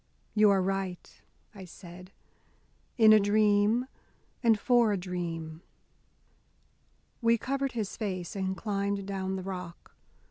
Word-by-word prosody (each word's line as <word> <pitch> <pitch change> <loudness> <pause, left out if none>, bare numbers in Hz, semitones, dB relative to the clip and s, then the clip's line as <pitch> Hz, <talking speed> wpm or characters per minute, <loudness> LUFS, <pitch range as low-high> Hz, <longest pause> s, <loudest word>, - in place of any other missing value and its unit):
"You 210 -1 +5
are 195 -2 +3
right," 190 -2 -4 0.3
I 195 -3 -10
said, 180 +1 -12 0.9
"in 220 -2 +7
a 215 - +7
dream, 210 +3 +3 0.6
and 225 -4 +3
for 240 -1 +3
a 200 - 0
dream." 170 -3 -5 1.6
We 230 0 +4
covered 275 +3 -2
his 220 -4 -3
face 185 -5 -4
and 190 -1 -2
climbed 200 -2 -2
down 190 -1 -3
the 190 - -5
rock. 180 -2 -8
200 Hz, 120 wpm, -29 LUFS, 185-215 Hz, 1.6 s, in